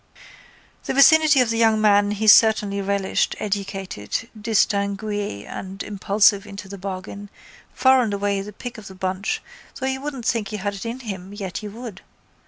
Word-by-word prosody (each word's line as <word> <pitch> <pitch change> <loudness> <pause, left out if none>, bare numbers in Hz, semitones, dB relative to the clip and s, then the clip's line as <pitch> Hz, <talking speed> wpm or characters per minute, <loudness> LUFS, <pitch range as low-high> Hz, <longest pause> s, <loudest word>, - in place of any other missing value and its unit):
The - - -2
vicinity 295 0 +6
of 235 -2 +1
the 230 - -1
young 220 -1 +4
man 205 -1 +4
he 210 +1 -2
certainly 215 -2 +5
relished, 200 -1 0
educated, 195 - -4
distingué 205 - -1
and 190 +1 -7
impulsive 200 0 +2
into 200 0 -9
the 200 0 -9
bargain, 195 +1 -7 0.5
far 260 0 +5
and 225 -4 -1
away 200 0 -1
the 205 +2 -8
pick 245 +2 -8
of 205 - -11
the 190 - -11
bunch 185 +1 -3 0.3
though 260 - -4
you 265 0 -2
wouldn't 275 -5 -6
think 225 -3 0
he 215 - -5
had 205 0 -3
it 200 +3 -6
in 240 +3 -5
him 195 -4 -7
yet 190 -6 -5
you 210 - -6
would. 225 -2 -9
205 Hz, 175 wpm, -22 LUFS, 195-225 Hz, 0.5 s, vicinity